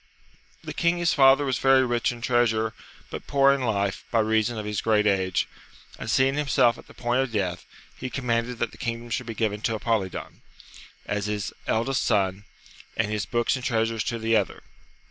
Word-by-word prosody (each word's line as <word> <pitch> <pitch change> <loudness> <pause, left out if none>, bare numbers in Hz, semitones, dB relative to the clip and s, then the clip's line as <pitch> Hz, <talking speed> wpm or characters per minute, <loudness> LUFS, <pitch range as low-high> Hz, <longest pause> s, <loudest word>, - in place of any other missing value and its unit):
The - - -6
king 170 0 +1
his 175 -1 +2
father 135 0 +6
was 130 -2 0
very 135 -1 +5
rich 120 -1 +1
in 120 -1 -9
treasure, 110 -2 +1 0.4
but - - -7
poor 140 -1 +5
in 140 - -2
life, 100 -5 -1
by 115 - 0
reason 110 +1 +1
of 105 - -4
his 105 -1 -2
great 105 -2 +2
age; 95 -2 +1 0.5
and - - -5
seeing 130 +1 +3
himself 130 -5 +2
at - - -15
the - - -16
point 120 +2 +1
of 135 -2 -2
death, 90 -5 -2 0.3
he 130 - -5
com 130 0 -5
manded 115 +1 0
that 120 0 -2
the - - -16
kingdom 115 0 -4
should 125 0 -2
be 115 - -5
given 105 -2 -1
to 115 0 0
Apolidon, 110 -4 -2 0.6
as 105 0 -2
his 105 -1 -3
eldest 125 +4 +1
son, 95 0 +1 0.5
and 105 -1 0
his 105 -3 -2
books 120 +1 +1
and 130 - -6
treasures 115 -2 0
to 120 - -2
the 115 0 +1
other. - - -1
115 Hz, 200 wpm, -25 LUFS, 105-125 Hz, 0.6 s, father